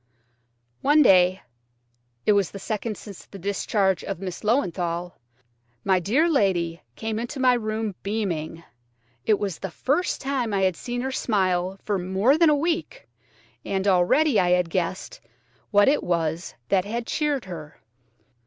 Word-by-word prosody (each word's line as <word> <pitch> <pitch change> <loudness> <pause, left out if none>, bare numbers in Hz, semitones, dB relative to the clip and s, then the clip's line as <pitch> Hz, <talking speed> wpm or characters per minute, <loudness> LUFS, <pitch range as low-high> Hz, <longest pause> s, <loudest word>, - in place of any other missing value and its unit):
One 295 +2 +5
day–it 120 - 0
was 200 -4 +2
the - - -9
second 215 +1 -4
since 200 -4 -11
the 200 - -11
discharge 195 -1 0
of - - -4
Miss 185 -2 -6
Löwenthal–my 170 - -2
dear 245 - +2
lady 180 - +1
came 220 0 -3
into 240 +4 -5
my 255 -1 +5
room 215 -2 -2
beaming. 170 -6 -3 0.6
It 215 - +4
was 195 -5 -3
the 195 - -4
first 290 - -1
time 255 -6 -1
I 195 - +1
had 185 -2 +2
seen 245 +7 -4
her 265 +1 -2
smile 190 -6 0
for 205 -2 -1
more 190 +9 +2
than 325 0 +5
a 300 - +4
week, 335 +10 -2 0.6
and 195 0 -2
already 200 - +4
I 180 - +2
had 180 -2 +2
guessed 185 - -3 0.5
what 205 -1 +4
it 290 +2 +3
was 165 -1 -2
that 190 -2 +3
had 230 +4 -4
cheered 290 -4 -1
her. 160 -5 -9
195 Hz, 145 wpm, -24 LUFS, 175-235 Hz, 0.6 s, One